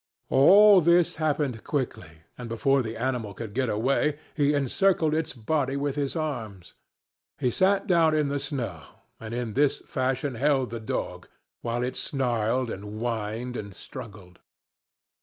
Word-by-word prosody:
All 195 +8 +7
this 170 0 +3
happened 145 -7 -1
quickly, 80 - -4
and 125 -2 -8
before 135 +4 +2
the 115 -1 -5
animal 115 -4 -2
could 110 -1 -7
get 130 0 0
away, 135 +7 +1 0.2
he 145 -1 +2
encircled 155 +3 +2
its 160 0 -1
body 135 +3 -1
with 140 0 -2
his 145 0 -2
arms. 115 - -5 0.6
He 125 - 0
sat 195 - +2
down 165 -5 +3
in 150 -2 +2
the 140 0 -1
snow, 120 - -4 0.4
and 110 -1 -8
in 120 -2 -3
this 145 +3 +2
fashion 130 +1 -1
held 135 0 +1
the 115 - -4
dog, 110 - -4 0.3
while 120 +1 -2
it 125 - -3
snarled 120 -2 -1
and 100 - -6 0.2
whined 115 +1 -3
and 100 -4 -6
struggled. 100 -6 -10
130 Hz, 150 wpm, -26 LUFS, 115-145 Hz, 0.6 s, All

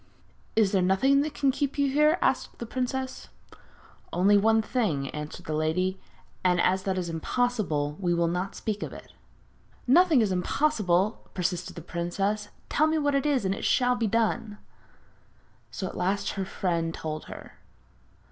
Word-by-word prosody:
'Is 215 -3 +3
there 195 - +2
nothing 210 +10 +3
that 300 +1 -3
can 275 -2 +2
keep 280 +1 -2
you 285 -1 +3
here?' 300 +4 +3
asked - - 0
the 235 - -5
princess. 260 +2 -3 0.8
'Only 195 +4 +4
one 220 +2 +4
thing,' 170 - -1
answered 150 0 -7
the 155 - -3
lady, 180 +5 0 0.4
'and 180 -1 +3
as 190 +2 +2
that 190 -1 0
is 180 -2 -2
impossible, 165 -4 -1
we 180 -3 0
will 170 0 +2
not 180 +3 -2
speak 210 -1 -3
of - - -5
it.' - - -12 0.7
'Nothing 315 0 +5
is 210 -3 +1
impossible,' 195 - +1
persisted 180 -1 -2
the 170 - -8
princess. 195 +5 -2 0.2
'Tell 310 - +2
me 315 0 +1
what 290 -2 +1
it 275 +2 +1
is, 270 -8 +1
and 190 - +1
it - - -6
shall 250 0 +3
be 235 -2 0
done.' 215 -1 0 1.1
So 190 - -5
at - - -6
last 195 +2 0
her 195 -1 -3
friend 170 -3 -2
told 155 -1 -5
her. - - -11
200 Hz, 165 wpm, -27 LUFS, 180-250 Hz, 1.1 s, Nothing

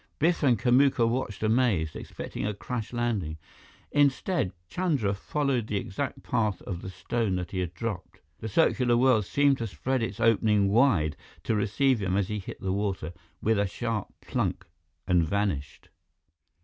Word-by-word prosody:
Biff 170 +3 +2
and 130 -6 +4
Kamuka 130 +1 +4
watched 115 -4 -2
amazed, 110 -9 +2
expecting - - -6
a 105 -1 -1
crash 115 +1 -5
landing. 110 -10 -1 0.5
Instead, 145 - +2 0.2
Chandra 140 - 0
followed 130 +2 -1
the 105 - -1
exact 105 +8 -4
path 110 -6 0
of 90 -3 -5
the 95 - -6
stone 110 +1 -1
that 90 -1 -4
he 95 - -2
had 90 -1 -3
dropped. 100 -2 -5 0.2
The 110 - -5
circular 120 -1 +3
well 125 -3 +4
seemed 140 +7 +2
to 115 - -2
spread 130 +5 -2
its 115 - -3
opening 110 -3 +3
wide 100 - +3 0.3
to - - 0
receive 110 +5 +2
him 95 0 0
as 100 0 0
he 105 0 -2
hit 95 - -8
the 95 -1 -1
water 95 -5 -2 0.3
with 110 -1 +2
a 100 - +2
sharp 115 +1 -3
plunk - - -2 0.4
and 90 -3 +3
vanished. 80 -6 -2
110 Hz, 160 wpm, -28 LUFS, 95-125 Hz, 0.5 s, and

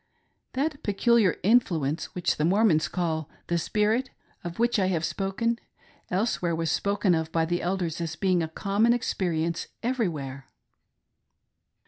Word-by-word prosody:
That 280 +2 -1
peculiar 210 -1 +3
influence 170 - +1
which 180 - +1
th€ 155 - +3
Mormons 190 -5 +3
call 160 -4 -2
" - - -34
the 170 0 +2
Spirit," 215 +8 +1 0.3
of 170 -1 -6
which 235 -1 +2
I 190 - +2
have 170 -3 0
spoken, 230 +4 -1 0.5
elsewhere, 180 -3 0
was 165 -1 -1
spoken 200 -2 +1
of 160 -1 -1
by 165 -1 +2
the 175 +1 -1
Elders 175 -2 -2
as 160 -1 -3
being 185 0 +2
a 160 - -1
common 200 +8 +2
experience 170 -8 -1 0.2
every 240 -3 +1
where. 135 -3 -7
180 Hz, 145 wpm, -27 LUFS, 165-220 Hz, 0.5 s, peculiar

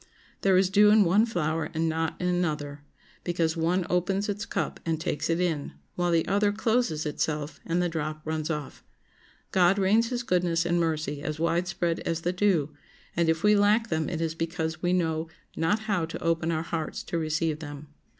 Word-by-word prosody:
There 190 -1 +4
is 190 0 +3
dew 210 +1 +6
in 210 0 +6
one 200 +6 +4
flower 160 -6 -1
and 165 +1 +1
not 160 0 -1
in 180 - -1
another, 150 -5 -1 0.4
because 170 -2 0
one 170 +2 +1
opens 190 +3 0
its 205 +2 -3
cup - - -2
and 165 -2 -1
takes 160 -1 -2
it 165 +1 +1
in, 165 -5 -1 0.2
while 175 0 0
the 165 -1 +2
other 205 +2 +2
closes 220 -7 0
itself 150 0 -2
and 175 +2 +1
the - - +1
drop 155 -2 -4
runs 155 0 -2
off. 150 -3 -5 0.7
God 185 +1 +4
rains 215 +4 +3
his 245 -1 -2
goodness 175 -4 +1
and 175 0 +1
mercy 155 -3 -1
as 155 +1 -4
widespread 170 0 0
as 165 0 -2
the 175 +2 -1
dew, 180 -6 +2 0.4
and 170 -1 +2
if 160 0 +1
we 210 0 +6
lack 210 +3 +3
them 160 -1 0
it 165 -2 -3
is 165 -1 -1
because 160 -1 -3
we 175 - +1
know 165 -3 0 0.3
not 185 +7 +1
how 200 -6 0
to 165 - -7
open 165 0 +1
our 160 -1 -1
hearts 165 -2 -4
to 170 - -2
receive 155 0 -1
them. 145 -1 -8
165 Hz, 195 wpm, -27 LUFS, 160-185 Hz, 0.7 s, dew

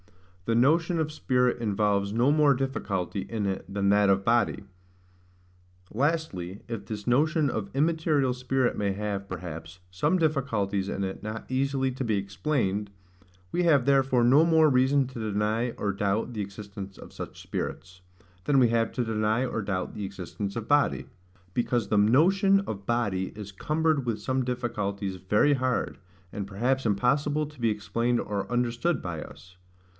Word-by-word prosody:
The 115 - +1
Notion 160 +7 +3
of 155 -1 -1
Spirit 125 -4 +1
involves 100 -2 +1
no 120 +6 +3
more 150 -2 +4
Difficulty 100 -8 -2
in 110 -3 -2
it 95 0 -3
than 100 0 +1
that 100 0 +4
of 95 0 +2
Body. 115 -3 +2 1.3
Lastly, 115 - -1
if 115 -4 -5
this 105 -2 -5
notion 150 +4 +3
of 105 -4 -3
immaterial 150 -2 +2
spirit 125 0 0
may 100 -1 0
have, 100 -1 -4
perhaps, 85 -1 -7
some 95 - +1
difficulties 110 - 0
in 100 - -2
it 95 - -6
not 110 +1 -5
easily 135 0 0
to 130 +1 -4
be 110 -4 +1
explained, 100 0 -1 0.6
we 180 - +1
have 145 -7 +4
therefore 135 -3 +3
no 135 +6 +6
more 160 -2 +5
reason 135 +1 +3
to 130 -2 -8
deny 110 +4 0
or 100 -1 -1
doubt 105 +4 -1
the 105 - -3
existence 100 -1 -8
of - - -12
such - - -8
spirits, 90 -1 -5 0.4
than 145 - +3
we 125 -3 +5
have 115 0 +1
to 125 - -1
deny 110 +2 +1
or 115 - -2
doubt 95 -2 -3
the 105 - -5
existence 95 +1 -5
of 115 -1 -5
body; 145 -1 +2 0.5
because 120 0 0
the 105 - +1
notion 185 - +4
of 100 - -6
body 105 -6 0
is 105 -2 -7
cumbered 155 +5 0
with 115 -3 -1
some 130 +4 -1
difficulties 105 -6 -3
very 105 +10 +3
hard, 130 -2 -1 0.3
and 100 -1 -4
perhaps 125 +7 0
impossible 140 +8 +1
to 150 -3 -13
be 115 - +3
explained 115 +3 0
or 100 +1 -3
understood 125 +7 0
by 85 -4 -5
us. 90 0 -12
115 Hz, 160 wpm, -27 LUFS, 100-135 Hz, 1.3 s, no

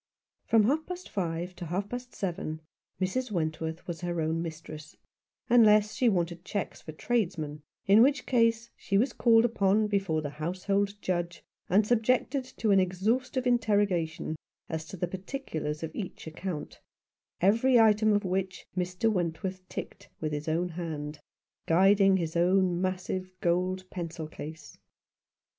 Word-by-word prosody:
From 225 -2 +5
half 295 +8 +1
past 365 0 -7
five 175 -1 -3
to 175 - -6
half 190 +5 -2
past 245 0 -6
seven 165 -4 -3 0.4
Mrs. 240 +7 -1
Wentworth 160 -2 -3
was 170 -1 -5
her 175 -1 -2
own 160 +1 0
mistress, 155 -2 -8 0.5
unless 215 -3 +5
she 245 +1 +3
wanted 175 -3 -1
cheques 200 0 -4
for 155 - -8
tradesmen; 155 -6 -2 0.2
in 200 +3 +7
which 275 +1 +3
case 230 -1 +2
she 195 - -1
was 245 +7 +2
called 230 -1 +5
up 210 -2 +2
before 190 -6 0
the 145 - -4
household 195 +6 -1
judge, 175 -1 -2 0.3
and 200 +4 +4
subjected 250 +4 +2
to 225 -4 -1
an 195 - +6
exhaustive 220 +8 0
interrogation 205 -10 +1 0.3
as 160 -1 -3
to 190 - -9
the 180 - -1
particulars 175 - -4
of 160 - -4
each 195 -5 -6
account, 160 -1 -6 0.6
every 230 +7 +4
item 215 -1 +5
of 205 -1 +2
which 185 0 -2
Mr. 180 +4 -1
Wentworth 185 -1 -1
ticked - - -7
with 155 -1 -2
his 150 +1 -4
own 170 +3 0
hand, 155 -3 -5 0.5
guiding 195 +3 +5
his 165 -2 -3
own 180 0 +3
massive 185 0 -2
gold 185 +2 0
pencil 170 -3 -5
case. 155 0 -9
185 Hz, 145 wpm, -29 LUFS, 165-215 Hz, 0.6 s, in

